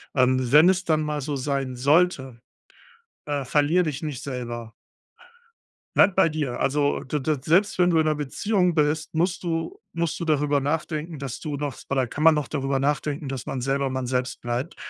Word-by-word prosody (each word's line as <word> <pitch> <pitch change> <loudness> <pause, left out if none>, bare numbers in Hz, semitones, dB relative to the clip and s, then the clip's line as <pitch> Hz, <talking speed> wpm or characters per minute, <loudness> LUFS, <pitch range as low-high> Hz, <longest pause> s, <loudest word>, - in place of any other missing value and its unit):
ähm, 130 -2 +2
wenn 150 +4 +7
es 190 0 +1
dann 155 -2 +1
mal 150 -1 -2
so 145 +1 -3
sein 135 -1 -2
sollte, 135 -3 +2 0.9
äh, 145 -2 -2
verlier 150 +6 +2
dich 150 -2 -4
nicht 150 -5 -5
selber. 120 -4 -5 1.2
Bleib 195 - +5
bei 190 - +5
dir. 150 -6 -3
Also, 145 +1 +1
d 150 +3 -2
d 150 +2 0
selbst 185 +8 +2
wenn 180 -1 +4
du 165 - +3
in 155 - +2
'ner 155 - +2
Beziehung 180 - 0
bist, 150 0 0
musst 175 +3 0
du 170 - -3
musst 170 0 -2
du 170 - -3
darüber 150 -2 +2
nachdenken, 155 +2 -3
dass 135 -3 -5
du 150 -3 -4
noch 145 -2 -4
oder 130 -2 0
kann 150 +6 -4
man 160 -1 +7
noch 150 -2 -1
darüber 135 -2 -1
nachdenken, 145 +2 -1
dass 130 -2 -5
man 130 - -4
selber 135 +1 0
man 130 -1 -3
selbst 125 0 -2
bleibt 120 +2 -3
145 Hz, 190 wpm, -24 LUFS, 135-160 Hz, 1.2 s, wenn